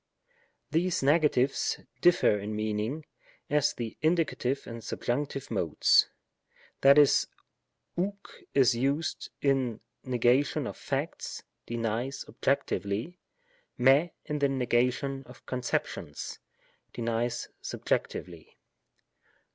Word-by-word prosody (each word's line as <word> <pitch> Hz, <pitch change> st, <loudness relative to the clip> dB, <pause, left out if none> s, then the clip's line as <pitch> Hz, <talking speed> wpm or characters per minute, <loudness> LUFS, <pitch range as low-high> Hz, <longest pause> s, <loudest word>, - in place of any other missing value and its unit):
These 170 Hz, -1 st, +1 dB
negatives 140 Hz, -3 st, +2 dB, 0.2 s
differ 170 Hz, -11 st, +5 dB
in 105 Hz, +2 st, -4 dB
meaning, 110 Hz, +8 st, -2 dB, 0.5 s
as 150 Hz, 0 st, +3 dB
the 115 Hz, -2 st, -5 dB
Indie, 155 Hz, -5 st, +1 dB
and 115 Hz, -1 st, -7 dB
Subjunc. 135 Hz, +3 st, -3 dB
Modes; 85 Hz, -8 st, +4 dB, 0.7 s
that 140 Hz, +1 st, +7 dB
is, 145 Hz, -2 st, +5 dB, 0.7 s
oi/^ 190 Hz, +4 st, 0 dB, 0.4 s
is 130 Hz, -2 st, +5 dB
used 140 Hz, +6 st, -1 dB
in 130 Hz, -5 st, +1 dB, 0.2 s
the -, -, -11 dB
negation 125 Hz, +3 st, +2 dB
of -, -, -5 dB
facts -, -, -4 dB, 0.2 s
(denies 120 Hz, +3 st, -2 dB
objectively); 135 Hz, -, -1 dB, 0.6 s
fir]^ 135 Hz, +7 st, +5 dB, 0.2 s
in 150 Hz, -1 st, -2 dB
the 140 Hz, -, +3 dB
nega 125 Hz, -2 st, +2 dB
tion 135 Hz, +1 st, -4 dB
of 125 Hz, -, -15 dB
conceptions 125 Hz, -, -3 dB, 0.5 s
(denies 115 Hz, +1 st, -2 dB
subjectively.) -, -, -3 dB
130 Hz, 100 wpm, -29 LUFS, 115-145 Hz, 0.7 s, that